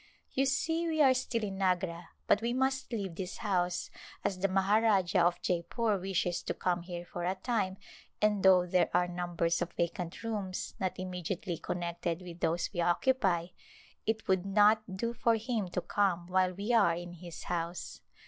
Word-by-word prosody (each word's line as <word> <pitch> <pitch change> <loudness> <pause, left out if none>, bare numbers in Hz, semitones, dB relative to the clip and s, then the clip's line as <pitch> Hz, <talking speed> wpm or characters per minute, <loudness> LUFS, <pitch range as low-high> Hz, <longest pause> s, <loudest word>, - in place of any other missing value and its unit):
You 270 +1 +1
see 325 +5 0
we 315 -1 -1
are 265 -2 +6
still 250 -3 -1
in 195 -2 -4
Agra 180 -2 0 0.2
but 205 - +3
we 235 +1 0
must 265 0 0
leave 200 -6 -3
this 180 +2 -5
house 180 -4 -1 0.3
as 185 - 0
the 195 - +2
Maharajah 195 -1 +3
of 175 +1 +2
Jeypore 195 +4 0
wishes 180 -2 0
to - - -3
come 175 -1 0
here 175 0 -6
for 175 0 -6
a 185 +2 0
time 195 -2 -1 0.4
and 210 -1 +2
though 185 -2 +6
there 180 0 +2
are 180 0 +3
numbers 175 -1 -1
of 175 0 -2
vacant 170 +3 -3
rooms 205 -5 -3
not 190 -2 -2
immediately 180 -1 -4
connected 170 0 -3
with 175 -1 -9
those 170 0 0
we 175 - 0
occupy, 175 -1 +2 0.6
it 220 0 -1
would 190 -2 +2
not 205 0 +3
do 235 +4 -1
for 230 -1 +2
him 225 -3 -2
to 180 0 -2
come 185 -4 +1
while 185 0 +2
we 200 +6 -2
are 200 -8 +5
in 175 0 -7
his 175 -1 -9
house. 170 0 -4
185 Hz, 175 wpm, -31 LUFS, 175-215 Hz, 0.6 s, are